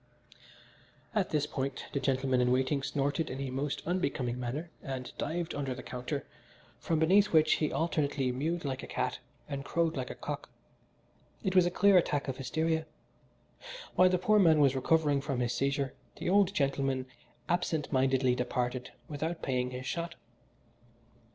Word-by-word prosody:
At 210 -4 +1
this 150 -2 +1
point 135 -2 -3
the 140 - +1
gentleman 130 -1 +1
in 125 0 +3
waiting 130 +2 +2
snorted 145 +3 -1
in 130 - -5
a 135 -2 -3
most 140 +2 -2
unbecoming 140 -9 -1
manner, 140 +8 -4
and 130 -2 -6
dived 170 0 -2
under 135 -3 -2
the 130 - -8
counter, 125 +3 -4 0.5
from 165 - 0
beneath 190 +6 +5
which 155 -4 +4
he 155 - 0
alternately 145 -5 0
mewed 155 +6 -2
like 130 -2 -2
a - - -8
cat - - -2 0.3
and 140 -2 -4
crowed 165 +2 0
like 130 -2 -3
a - - -6
cock. - - -5 0.9
It 190 0 -1
was 180 -1 +6
a - - +2
clear 200 +2 +5
attack 145 -4 -1
of 130 -1 -3
hysteria. 160 +4 -1 1.1
While 185 0 +6
the 180 - +2
poor 210 +4 +3
man 160 -5 +6
was 140 -2 +4
recovering 145 +1 +2
from 135 -3 -2
his 120 -1 0
seizure 140 0 0 0.2
the - - -2
old 200 -1 +5
gentleman 135 -5 0 0.4
absent 170 -4 0
mindedly 130 -1 +3
departed 125 0 -2 0.2
without 160 +3 -4
paying 125 -1 0
his 125 +1 -6
shot. 170 +4 -3
140 Hz, 165 wpm, -31 LUFS, 130-165 Hz, 1.1 s, was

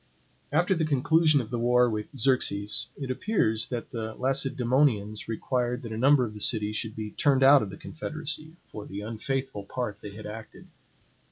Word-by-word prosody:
After 175 +6 +3
the 165 -3 0
conclusion 155 +1 +3
of 115 - -9
the 120 - -2
war 125 +1 +4
with 110 -2 -3
Xerxes, 105 -5 +1
it 135 -2 -4
appears 125 - +1
that 120 -2 -5
the 110 -2 -5
Lacedaemonians 130 -4 +1
required 125 +2 -2
that 115 - -7
a - - -3
number 130 +1 +4
of 110 - -7
the 105 - -9
cities 105 -1 +1
should 110 -1 -3
be 110 -1 -5
turned 135 -2 +2
out 140 +1 +8
of 105 - -3
the - - -9
confederacy 155 0 -5
for 105 - -9
the 100 +1 -6
unfaithful 115 +1 -3
part 115 +1 -4
they 100 -1 -9
had 110 - -9
acted. 110 +1 -9
125 Hz, 180 wpm, -27 LUFS, 110-135 Hz, -, out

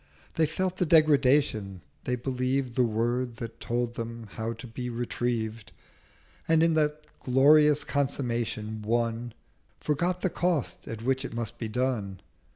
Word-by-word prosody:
They 160 -1 +2
felt 185 +4 -2
their 180 - +1
Degradation: 140 - +3 0.2
they 125 - 0
believed 130 0 -1
The 125 - +2
word 120 +1 0
that 115 -1 -7
told 120 0 -1
them 115 0 -6
how 110 +1 -3
to 115 +2 -10
be 125 +1 -5
retrieved, 115 -2 -3 0.7
And 160 0 +4
in 165 0 +4
that 150 -1 0
glorious 150 +3 +5
Consummation 120 -6 -2
won 115 +1 -1 0.4
Forgot 175 +5 0
the 185 - 0
Cost 175 -6 -1
at 115 -1 -6
which 130 +1 +1
it - - -6
must 115 0 -4
be 115 - -3
done. 110 -5 -2
125 Hz, 145 wpm, -28 LUFS, 115-145 Hz, 0.7 s, glorious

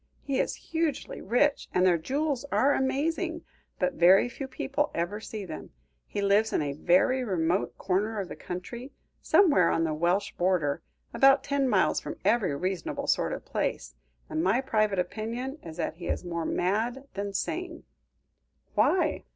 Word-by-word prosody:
He 275 -2 -1
is - - 0 0.2
hugely 320 -4 -2
rich, 275 +7 +1
and 180 0 +4
their 175 -2 +4
jewels 280 - -1
are 280 +2 +3
amazing, 320 +6 -1 0.3
but 275 - 0
very 185 +4 +6
few 265 +2 -6
people 280 +2 -1
ever 175 +5 -2
see 215 -2 -6
them. 160 -3 -8 0.4
He 205 - -3
lives 205 +2 +3
in - - +1
a 140 -1 -2
very 185 - +3
remote 180 -3 0
corner 205 +3 0
of 195 - -3
the - - -7
country, 235 +9 -7 0.3
somewhere 290 - +5
on 165 - +1
the 160 -1 0
Welsh 175 +6 +1
border, 175 -6 0 0.3
about 270 +3 +5
ten 280 -2 0
miles 195 -5 +3
from - - -7
every 205 -11 +2
reasonable 185 +3 -3
sort - - +1
of - - -5
place, 60 - -2 0.3
and 155 - -2
my 195 +7 +3
private 215 -6 +1
opinion 230 - -3
is 160 -1 -9
that 165 - -3
he 175 - -7
is - - -2
more 170 -2 -3
mad 225 +8 0
than 200 +1 -3
sane." 335 - -3 0.9
"Why?" 370 - +2
210 Hz, 165 wpm, -28 LUFS, 180-270 Hz, 0.9 s, very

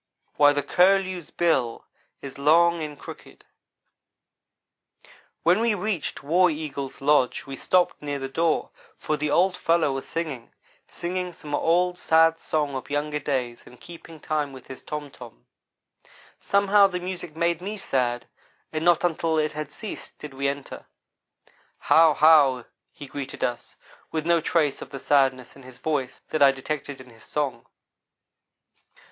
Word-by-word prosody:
Ho!" - - -47
WHY 145 - +7
THE 145 0 -1
CURLEW'S 185 +1 +2
BILL 135 -9 0 0.4
IS 140 0 -8
LONG 170 +3 +4
AND 150 -2 -6
CROOKED - - -12 2.0
WHEN 175 +5 +4
we 230 -2 +2
reached 200 -8 -3
War 175 +5 +4
Eagle's 150 -4 -5
lodge 140 -3 +2
we 135 - -7
stopped 180 +5 +1
near 145 -1 -3
the 135 -1 -4
door, 160 +4 0 0.3
for 155 - -2
the 150 0 -2
old 180 +5 +3
fellow 165 -4 +1
was 135 0 -5
singing 150 -8 -5 0.4
singing 180 +1 -4
some 150 -2 -9
old, 180 +4 +1
sad 165 0 +4
song 150 -2 -1
of 130 -2 -6
younger 150 +1 -2
days 130 -4 -3
and 125 - -16
keeping 165 -2 -12
time 150 -2 -2
with 130 -2 -12
his 130 - -10
tom 150 -2 -6
tom. - - -14 0.9
Somehow 200 0 +4
the 180 -2 -4
music 180 -3 -6
made 170 +1 0
me 205 +3 -5
sad 125 - -1 0.5
and 155 0 -2
not 175 0 +3
until 165 -2 0
it 155 0 +1
had 155 0 -6
ceased, 215 - -8
did 150 -2 -9
we 140 +1 -1
enter. 140 0 -6 0.9
"How! 160 -2 +4
How!" 140 -5 +5 0.3
he 145 - -10
greeted 135 0 -6
us, 120 -1 -3 0.4
with 160 -1 -2
no 170 -1 +3
trace 150 -3 0
of - - -8
the 135 - -7
sadness 135 -3 +1
in 140 - -14
his 130 -1 -13
voice 145 -5 -3
that 155 - -1
I 140 -1 +8
detected 140 +1 -5
in 125 -1 -15
his 115 -1 -18
song. 140 -6 -3
150 Hz, 155 wpm, -25 LUFS, 135-170 Hz, 2.0 s, I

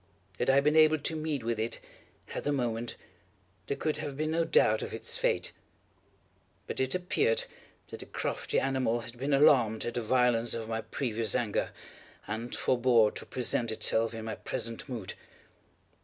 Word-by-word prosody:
Had - - +1
I 135 +1 +6
been 150 +2 +2
able 155 0 +6
to 155 +2 -3
meet 155 -5 -2
with 115 -1 -1
it, 115 +1 -2 0.5
at - - -4
the 145 - 0
moment, 120 -4 -2 0.7
there 140 - -2
could 155 - -1
have 145 -3 -5
been 155 +1 -1
no 165 +1 +2
doubt 110 -8 +3
of - - -4
its - - -1
fate; - - +1 1.1
but - - -5
it 130 +3 0
appeared 180 -10 +1 0.5
that - - -8
the - - -9
crafty - - -1
animal 130 -3 0
had 115 +1 -9
been 140 +3 -1
alarmed 130 -6 +4
at 120 - -3
the 120 - -1
violence 120 0 +2
of 115 -1 -4
my 110 0 -1
previous 115 -2 -2
anger, 110 -4 0 0.6
and 110 +3 -4
forebore 120 -4 +3
to - - -8
present 120 -2 -1
itself 115 +1 +1
in 110 -1 -6
my 110 - -3
present 115 +3 -5
mood. 115 -7 -5
120 Hz, 170 wpm, -30 LUFS, 115-140 Hz, 1.1 s, I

